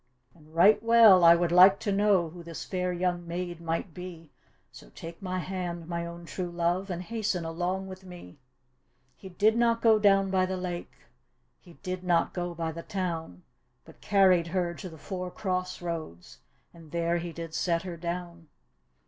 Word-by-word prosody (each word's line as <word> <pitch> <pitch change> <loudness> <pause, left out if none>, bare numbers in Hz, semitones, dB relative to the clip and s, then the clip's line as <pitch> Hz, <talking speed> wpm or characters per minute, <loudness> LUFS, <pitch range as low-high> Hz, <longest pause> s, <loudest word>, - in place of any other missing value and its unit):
" 125 +1 -41
And 155 -1 -20
right 195 +6 +6
well 225 -5 +7
I 170 0 +9
would 170 0 0
like 185 +2 +7
to 210 - -1
know 195 -5 +2
Who 175 +1 -10
this 170 -1 -8
fair 180 -1 -2
young 175 -1 -2
maid 175 0 -5
might 165 +1 -3
be, 170 -3 -10 0.4
So - - -14
take 165 - -10
my 185 -1 -3
hand, 175 -2 -4
my 170 0 -3
own 170 0 -9
true 180 +1 -5
love, 175 +3 -1
And 180 -1 -4
hasten 210 -4 -2
along 180 +4 -2
with 190 0 -10
me," 175 - -12 0.8
He 190 - -11
did 210 +5 +2
not 235 -1 +2
go 225 -2 +4
down 195 -2 +3
by 185 -1 +2
the 190 0 -3
lake 180 -1 -5 0.6
He 175 - -17
did 185 -1 -4
not 175 -2 +1
go 175 -1 -4
by 165 -1 -3
the 165 +1 -7
town, 165 - -4 0.4
But - - -17
carried 190 -4 +4
her 175 0 -1
to 185 +1 -8
the 160 - -12
four 180 +2 -5
cross 185 -1 -3
roads, 120 - -6 0.3
And 165 -2 -15
there 170 +2 0
he 170 0 -5
did 165 -1 -8
set 170 0 0
her 180 -2 -6
down. 170 0 -6
175 Hz, 185 wpm, -28 LUFS, 170-185 Hz, 0.8 s, I